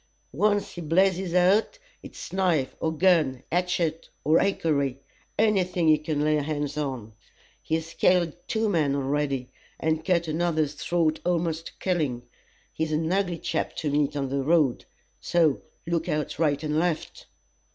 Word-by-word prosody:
Once 205 +6 +1
he 175 - -7
blazes 180 +2 +1
out, 195 - +3 0.2
it's - - -10
knife 175 -8 +1
or 160 - 0
gun, 160 -6 +2
hatchet 175 -2 -1
or 155 +2 +4
hickory 140 -9 0 0.4
any 210 -4 +3
thing 180 -2 -1
he 155 -1 +6
can 150 -1 -2
lay 155 0 +3
hands 145 -1 -2
on. 130 -7 -4 0.5
He's 160 +1 -3
killed 175 -3 +2
two 220 0 0
men 155 -8 +1
already, 140 -2 -1 0.3
and 160 0 0
cut 170 -1 +1
another's 155 -2 0
throat 160 +1 0
a'most 165 -2 -1
to - - -12
killing. 150 -10 -1 0.5
He's 160 0 -2
an 160 +3 0
ugly 190 -3 0
chap - - -3
to 150 - -2
meet 145 0 +1
on 135 -2 -2
the 140 +1 -1
road, 145 -3 +2 0.3
so 165 -5 +2 0.2
look 165 -1 -1
out 150 -1 -2
right 150 -2 +1
and 150 0 0
left." 170 -2 -2
160 Hz, 150 wpm, -26 LUFS, 145-175 Hz, 0.5 s, he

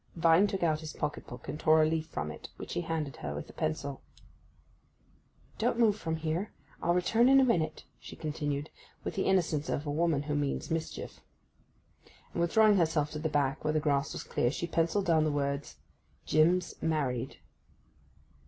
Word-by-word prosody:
Vine 165 +4 +5
took 195 -2 -3
out 155 -2 +2
his 155 -1 -7
pocket 150 0 -4
book 125 0 -10
and 150 - -4
tore 155 0 +5
a - - +4
leaf 160 0 -1
from 75 - -4
it, 75 - -10
which - - -7
he - - -1
handed 160 -5 -3
her 70 -1 -5
with 75 - -6
a - - -23
pencil. 135 - -3 1.6
'Don't 235 +1 +1
move 225 -4 +4
from 165 -6 -3
here—I'll 165 +1 -3
return 225 +7 +3
in 270 0 +7
a - - +6
minute,' 160 -10 0 0.2
she - - -10
continued, 150 -1 -3 0.3
with - - -3
the 195 - -1
innocence 165 -5 +1
of 145 - -2
a 145 - -2
woman 155 -2 +1
who 150 0 -3
means 145 +1 -1
mischief. 160 0 -4 1.1
And, - - -1
withdrawing 210 +4 +5
herself 160 -4 +1
to 150 - -5
the 160 +1 -1
back, 145 -1 0
where 155 0 +1
the 155 - +2
grass 145 -1 +1
was - - -5
clear, 120 - 0
she 155 - -3
pencilled 170 +4 +1
down 160 -2 +4
the 155 - +1
words 140 0 -2 0.5
'JIM'S 170 +4 +2
MARRIED. 135 -6 -1
155 Hz, 180 wpm, -30 LUFS, 145-170 Hz, 1.6 s, in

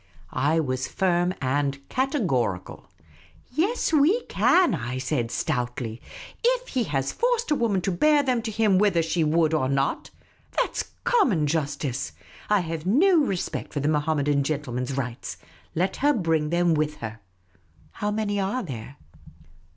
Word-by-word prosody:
I 145 +5 +2
was 130 -3 -1
firm, 180 -1 +1
and 140 +1 -1
categorical. 185 - -1 0.3
" - - -24 0.3
Yes, 345 - 0
we 320 - +4
can," 360 - +3
I 125 -4 -3
said, 130 -2 -1
stoutly; 120 -1 -3 0.2
" - - -17
if - - +1
he 250 -4 0
has 135 -4 -1
forced 475 -4 0
a - - +5
woman 220 -7 +1
to 195 - -1
bear 295 - +4
them 255 -3 +1
to 225 - -4
him 210 -3 +3
whether 195 -5 +3
she 165 +1 0
would 160 +1 +2
or 130 -5 +1
not. 135 0 0 0.5
That - - 0
's - - -1 0.2
common 240 - +3
justice. 140 -3 -2 0.4
I 210 -2 +4
have 165 -2 -4
no 340 - +5
respect 195 -12 -2
for 145 - -1
the 145 +2 0
Mohammedan 150 -2 +1
gentleman's 135 -3 -3
rights. 125 -3 -4 0.4
Let 185 +3 0
her 290 +2 +3
l)ring 165 -7 +1
them 170 0 +2
with 150 -1 0
her. 110 -3 -7 0.7
How 210 - -3
many 210 -1 -1
are 200 +7 -1
there 130 - -7
165 Hz, 160 wpm, -25 LUFS, 140-225 Hz, 0.7 s, a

